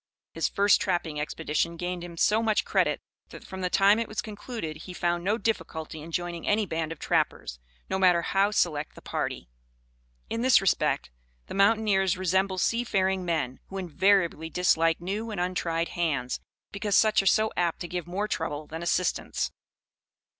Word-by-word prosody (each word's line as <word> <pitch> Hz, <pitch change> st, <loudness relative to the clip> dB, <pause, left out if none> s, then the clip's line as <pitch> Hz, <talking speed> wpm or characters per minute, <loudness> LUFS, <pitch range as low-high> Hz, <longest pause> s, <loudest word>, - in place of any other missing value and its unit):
His -, -, 0 dB
first 200 Hz, 0 st, +4 dB
trapping 175 Hz, -5 st, -1 dB
expedition 160 Hz, +2 st, -2 dB
gained 180 Hz, 0 st, -3 dB
him 170 Hz, -1 st, -9 dB
so 215 Hz, +6 st, +3 dB
much 220 Hz, -2 st, +1 dB
credit, -, -, +1 dB, 0.3 s
that -, -, -11 dB
from 190 Hz, 0 st, -7 dB
the 180 Hz, -, 0 dB
time 200 Hz, +3 st, +5 dB
it 230 Hz, -, -1 dB
was 215 Hz, -, -5 dB
concluded, 210 Hz, -7 st, -5 dB
he 180 Hz, +3 st, -9 dB
found 175 Hz, -1 st, 0 dB
no 205 Hz, +4 st, +1 dB
difficulty 165 Hz, -7 st, -3 dB
in 165 Hz, +2 st, -9 dB
joining 175 Hz, 0 st, -3 dB
any 210 Hz, +1 st, +2 dB
band 160 Hz, -3 st, -3 dB
of 165 Hz, -, -6 dB
trappers, -, -, -1 dB, 0.3 s
no 190 Hz, -, -1 dB
matter 180 Hz, -3 st, +4 dB
how 195 Hz, +3 st, +2 dB
select 160 Hz, -8 st, 0 dB
the -, -, -12 dB
party. -, -, -3 dB, 0.8 s
In 230 Hz, -, -3 dB
this 255 Hz, +1 st, +6 dB
respect 190 Hz, -, +1 dB, 0.3 s
the -, -, -8 dB
mountaineers 195 Hz, -2 st, +3 dB
resemble 190 Hz, +1 st, +1 dB
sea 230 Hz, +6 st, +1 dB
faring 190 Hz, -4 st, 0 dB
men, 155 Hz, -7 st, -2 dB
who 195 Hz, -, -7 dB
invariably 185 Hz, -2 st, +2 dB
dislike 165 Hz, -2 st, +2 dB
new 205 Hz, +6 st, -3 dB
and 210 Hz, -4 st, -4 dB
untried 170 Hz, -2 st, -1 dB
hands, 140 Hz, -8 st, -1 dB, 0.3 s
because 200 Hz, 0 st, +1 dB
such 215 Hz, -2 st, +4 dB
are 195 Hz, -, -2 dB
so 220 Hz, +3 st, +3 dB
apt 175 Hz, -2 st, 0 dB
to 175 Hz, -, -4 dB
give 175 Hz, -1 st, -4 dB
more 195 Hz, +4 st, -2 dB
trouble 155 Hz, -6 st, -3 dB
than 160 Hz, +2 st, -7 dB
assistance. 175 Hz, +1 st, 0 dB
180 Hz, 175 wpm, -27 LUFS, 165-200 Hz, 0.8 s, this